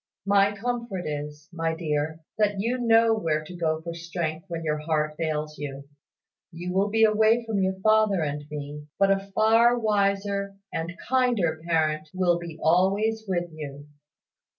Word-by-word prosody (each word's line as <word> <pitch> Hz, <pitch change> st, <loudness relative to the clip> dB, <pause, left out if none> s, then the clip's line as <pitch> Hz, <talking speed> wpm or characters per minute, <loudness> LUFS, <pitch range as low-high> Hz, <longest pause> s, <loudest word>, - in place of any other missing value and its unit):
My 200 Hz, 0 st, +4 dB
comfort 235 Hz, -3 st, -3 dB
is, 150 Hz, 0 st, -5 dB
my 165 Hz, -1 st, -1 dB
dear, 155 Hz, -1 st, -2 dB, 0.2 s
that 205 Hz, -1 st, +3 dB
you 240 Hz, +5 st, 0 dB
know 230 Hz, -1 st, +5 dB
where 160 Hz, -8 st, 0 dB
to 180 Hz, +4 st, -10 dB
go 160 Hz, -2 st, -1 dB
for 170 Hz, 0 st, -5 dB
strength 170 Hz, -1 st, -4 dB
when 165 Hz, -2 st, -5 dB
your 150 Hz, -1 st, -1 dB
heart 150 Hz, -1 st, -1 dB
fails 155 Hz, -1 st, -3 dB
you. 140 Hz, -1 st, -6 dB, 0.6 s
You 175 Hz, +2 st, -5 dB
will 195 Hz, +2 st, +2 dB
be 225 Hz, +2 st, +3 dB
away 220 Hz, +2 st, +4 dB
from 220 Hz, -3 st, -1 dB
your 190 Hz, 0 st, 0 dB
father 215 Hz, -4 st, +3 dB
and 145 Hz, 0 st, -3 dB
me; 150 Hz, 0 st, -7 dB
but 195 Hz, 0 st, +4 dB
a 195 Hz, 0 st, 0 dB
far 230 Hz, +2 st, +5 dB
wiser 200 Hz, -2 st, 0 dB, 0.2 s
and 170 Hz, +2 st, -4 dB
kinder 235 Hz, -12 st, +1 dB
parent 155 Hz, -2 st, +1 dB
will 175 Hz, -2 st, +2 dB
be 170 Hz, -2 st, -8 dB
always 200 Hz, +6 st, +2 dB
with 175 Hz, -2 st, -1 dB
you. 145 Hz, -2 st, -8 dB
175 Hz, 160 wpm, -26 LUFS, 155-210 Hz, 0.6 s, know